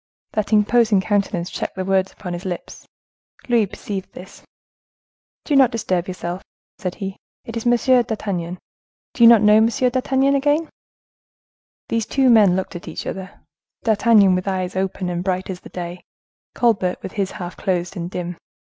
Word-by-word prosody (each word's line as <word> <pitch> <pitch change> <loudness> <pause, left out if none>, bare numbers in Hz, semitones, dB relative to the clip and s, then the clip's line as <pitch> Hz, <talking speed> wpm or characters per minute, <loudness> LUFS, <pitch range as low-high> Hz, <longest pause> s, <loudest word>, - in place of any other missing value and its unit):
That 215 0 -2
imposing 215 0 +4
countenance 195 -3 -1
checked - - -4
the 185 0 -3
words 190 0 +1
upon 180 -3 -7
his 175 +1 -6
lips. 180 -3 -7 0.6
Louis 235 -4 +3
perceived 195 0 -6
this. 185 - -12 1.0
"Do 295 - +1
not 265 -3 +6
disturb 185 -7 -1
yourself," 180 0 -5 0.4
said 180 -4 -4
he; 195 -2 -6 0.3
"it 230 - -7
is 230 +1 -2
M. 240 - +5
d'Artagnan,—do 215 -4 -2
you - - +10
not 230 -3 +6
know 210 0 +6
M. 220 +1 +5
d'Artagnan 260 +3 +1
again?" 290 +3 +1 1.2
These 230 -1 -1
two 265 -2 +3
men 205 -6 +6
looked 190 -1 -3
at 175 - -8
each - - -6
other—D'Artagnan, 205 +2 +1
with 185 +1 -1
eyes 185 -1 -2
open 190 -1 -2
and 175 0 -2
bright 185 0 -2
as 180 - -7
the - - -13
day—Colbert, 180 +3 -3
with - - -6
his 195 -2 -2
half 175 -1 -7
closed, 180 -2 -2
and 175 -1 -4
dim. 175 -1 -5
195 Hz, 155 wpm, -21 LUFS, 180-230 Hz, 1.2 s, you